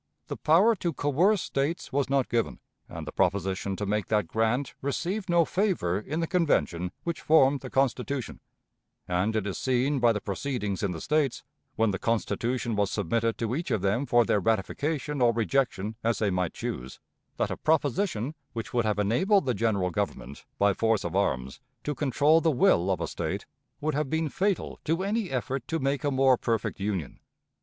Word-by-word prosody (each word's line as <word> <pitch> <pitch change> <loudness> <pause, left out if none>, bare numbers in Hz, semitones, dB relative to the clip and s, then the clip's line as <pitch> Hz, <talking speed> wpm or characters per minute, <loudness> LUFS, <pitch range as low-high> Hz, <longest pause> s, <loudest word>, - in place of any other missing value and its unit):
The - - -3
power 185 +9 +5
to 170 -2 -2
coerce 170 +9 +2
States 140 +4 -2
was 140 -1 +1
not 135 -2 +2
given, 120 -2 -1 0.3
and 80 -1 -7
the 75 - -6
proposition 95 +1 0
to 105 - -3
make 105 0 -1
that 105 -3 +1
grant 115 +7 0
received 180 +8 -2
no 170 -1 +4
favor 180 - 0
in 150 +10 -3
the - - +1
Convention 90 - +1
which 170 -1 -3
formed 140 -3 +4
the 130 - -8
Constitution; 135 0 -1 0.7
and 90 +5 0
it 110 -3 0
is 100 - -3
seen 130 +2 +1
by 120 -1 +5
the 105 - -1
proceedings 105 -1 -3
in 100 - 0
the 85 -3 -5
States, 150 -4 0 0.3
when 110 -1 +2
the 95 - -3
Constitution 115 +1 -1
was 100 -1 +1
submitted 115 +3 0
to 115 0 -2
each 165 +6 -3
of 105 -4 0
them 115 +8 +1
for 120 -1 +4
their 105 - +2
ratification 140 - -1
or 120 -1 +5
rejection 115 -3 0
as 115 0 +1
they 105 -3 +1
might 90 -2 -1
choose, 65 +1 -5 0.4
that - - 0
a - - -3
proposition 150 - 0 0.2
which 120 +4 -5
would 120 -2 +2
have 105 -2 +1
enabled 155 - +2
the 125 - +1
General 100 -4 0
Government, 70 -4 -4
by 100 0 +3
force 110 +1 +1
of 85 +1 -4
arms, 65 -10 -1 0.2
to 150 - -2
control 145 +4 +3
the 165 - +3
will 95 - +3
of 90 -3 0
a - - -1
State, - - -4 0.3
would 155 +1 -1
have 145 -1 -1
been 160 0 0
fatal 195 +5 -1
to 165 +4 0
any 205 -1 -1
effort 130 +1 -3
to 165 - -1
make 140 -2 -1
a 145 - +2
more 135 -2 +4
perfect 115 -5 -1
Union. 95 -7 -3
120 Hz, 190 wpm, -27 LUFS, 100-150 Hz, 0.7 s, power